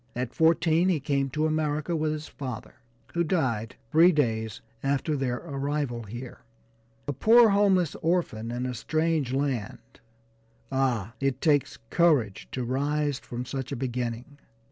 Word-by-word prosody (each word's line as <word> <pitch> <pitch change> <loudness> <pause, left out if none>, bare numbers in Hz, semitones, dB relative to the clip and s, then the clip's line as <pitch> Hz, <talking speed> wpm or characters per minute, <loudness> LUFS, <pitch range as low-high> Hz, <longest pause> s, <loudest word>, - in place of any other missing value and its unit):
At 125 0 -3
fourteen 165 +2 +3
he 170 -5 +2
came 140 -1 0
to 155 +4 0
America 155 +1 0
with 155 -1 0
his 155 0 -5
father, 130 -6 -7 0.4
who 170 - +2
died 130 - -1 0.2
three 170 +3 +7
days 110 - 0 0.2
after 140 +3 0
their 130 -3 -1
arrival 140 -5 -3
here. 120 +4 -8 0.7
A 145 - -1
poor, 225 - +6
homeless 195 -5 +3
orphan, 160 -10 0
in 120 +1 -3
a 125 - -2
strange 155 +1 0
land 135 -6 -3 0.7
ah! 120 -6 0
it 135 -1 0
takes 145 -2 +2
courage 145 - +2
to 130 - -3
rise 145 +2 0
from 120 +1 -6
such 135 +1 -5
a - - -1
beginning. 125 +2 -4
140 Hz, 145 wpm, -27 LUFS, 125-155 Hz, 0.7 s, three